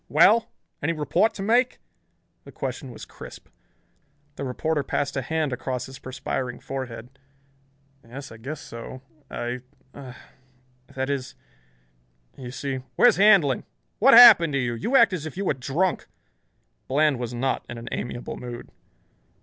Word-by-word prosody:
"Well! 210 +9 +5 0.3
Any 160 +3 0
report 160 +8 +1
to 195 - -5
make?" 245 +4 +2 0.7
The - - -13
question - - -5
was - - -10
crisp. - - -12 0.9
The - - -6
reporter 145 +4 -1
passed 140 0 -2
a 135 - -1
hand 155 +1 -1
across 125 0 -4
his 135 0 -11
perspiring 130 -1 -4
forehead. 130 -1 -7 0.8
"Yes, 130 +4 -10
I 110 - -11
guess 135 +6 -7
so. 115 +3 -9 0.3
I 120 +1 -4 0.3
er 130 -3 -10 0.8
that 130 +1 -2
is 135 -3 -4 1.0
you 125 -2 -8
see 135 +1 -4
" - - -41
"Where's 245 -5 +5
Handlon? 195 - +5 0.4
What 265 +4 +7
happened 170 -10 +9
to 140 - +1
you? 120 -2 -1
You 175 - -2
act 265 - +6
as 160 -4 -4
if 155 - -10
you 195 - -2
were - - +2
drunk." 140 +8 -1 0.8
Bland 145 -1 +2
was 120 -1 -4
not 130 +3 -1
in 120 - -6
an 115 +1 -9
amiable 120 0 -5
mood. 120 -1 -8
135 Hz, 150 wpm, -24 LUFS, 125-160 Hz, 1.0 s, happened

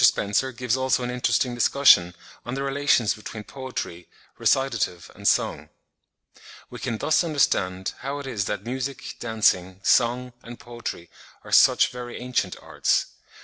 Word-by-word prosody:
Spencer 105 +6 +3
gives 125 -1 -1
also 130 -1 +1
an 125 - -2
interesting 125 0 0
discussion 120 -8 +4 0.3
on 120 +3 -5
the 135 - -3
relations 140 -5 +2
between 110 0 -8
poetry, 105 -6 -7 0.3
recitative 115 -10 0
and - - -4
song.) - - +1 1.0
We 125 - -8
can 120 -3 -3
thus 155 +9 +2
understand 95 - 0
how 140 +2 -4
it 145 - -7
is 110 -7 -2
that 105 0 -3
music, 130 0 -5
dancing, 95 -5 +1
song, 125 +1 +2
and 120 +1 -11
poetry 120 -8 -7 0.3
are - - -12
such - - +5
very 125 -1 -7
ancient 125 -7 -1
arts. - - 0
120 Hz, 145 wpm, -24 LUFS, 105-130 Hz, 1.0 s, such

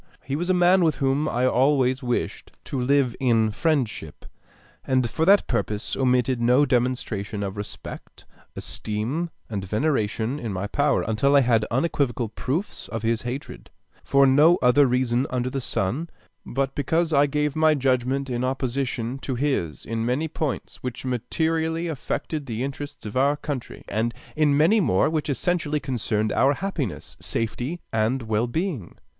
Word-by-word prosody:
He 135 - -3
was 175 +4 -2
a 185 - +4
man 180 +1 +5
with 160 -3 +2
whom 140 +3 +1
I 125 +1 +1
always 130 0 +3
wished 120 -2 -3
to 135 - -3
live 135 -1 +2
in 115 -5 +3
friendship, 125 - -1 0.6
and 130 -2 +1
for 160 +8 -1
that 200 +3 +6
purpose 110 -3 -2
omitted 125 -1 +2
no 125 +5 +4
demonstration 120 -6 -1
of 95 0 -4
respect, 105 0 -8 0.3
esteem, 120 +11 -3 0.2
and 100 -4 -4
veneration 110 +3 0
in 115 -6 -4
my 95 +1 -3
power, 140 +7 +1
until 125 +6 +2
I 140 - +7
had 115 -4 +3
unequivocal 130 -4 0
proofs 150 - -3
of 115 -1 -5
his 115 0 +1
hatred, 120 - -6 0.3
for 140 0 +4
no 150 +6 +6
other 130 +3 +5
reason 125 +1 +1
under 125 0 -1
the 135 - -2
sun 125 - -2 0.3
but 135 +1 -2
because 160 +4 0
I 145 0 +5
gave 150 0 -1
my 155 0 +4
judgment 135 0 0
in 125 -1 -2
opposition 130 -1 -2
to 135 -1 -3
his 120 - -1
in 115 0 -2
many 130 +7 0
points 155 -3 -4
which 125 0 -6
materially 160 +6 -1
affected 155 -1 -3
the 115 +1 -3
interests 140 0 -6
of 105 - -6
our 140 +3 +3
country, 145 -5 -6
and 115 +3 -1 0.2
in 150 -2 +3
many 170 +9 +5
more 125 - +2
which 155 -2 -1
essentially 150 +1 0
concerned 110 -5 -1
our 140 +2 +3
happiness, 160 - -4
safety, 125 +9 -3
and 115 +4 +1
well 110 +1 0
being. 145 - -3
130 Hz, 160 wpm, -24 LUFS, 115-150 Hz, 0.6 s, I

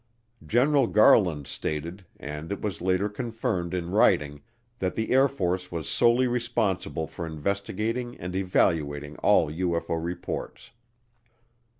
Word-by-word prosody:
General 135 +2 +3
Garland 90 -9 +4
stated, 85 +7 -5
and 75 +4 -6
it 100 - -3
was 105 -5 -4
later 95 +2 +1
confirmed 110 -5 -3
in 90 -1 -3
writing, 75 -7 +2 0.4
that 95 -1 -1
the 110 - -2
Air 135 +2 +5
Force 90 -8 -2
was 85 -3 -4
solely 120 +2 +3
responsible 115 -9 -1
for 85 - -8
investigating 100 +9 -3
and 90 +1 -6
evaluating 75 -6 0
all 95 -7 +3
UFO 85 -1 -1
reports. 85 +1 -5
95 Hz, 120 wpm, -26 LUFS, 80-110 Hz, 0.4 s, Air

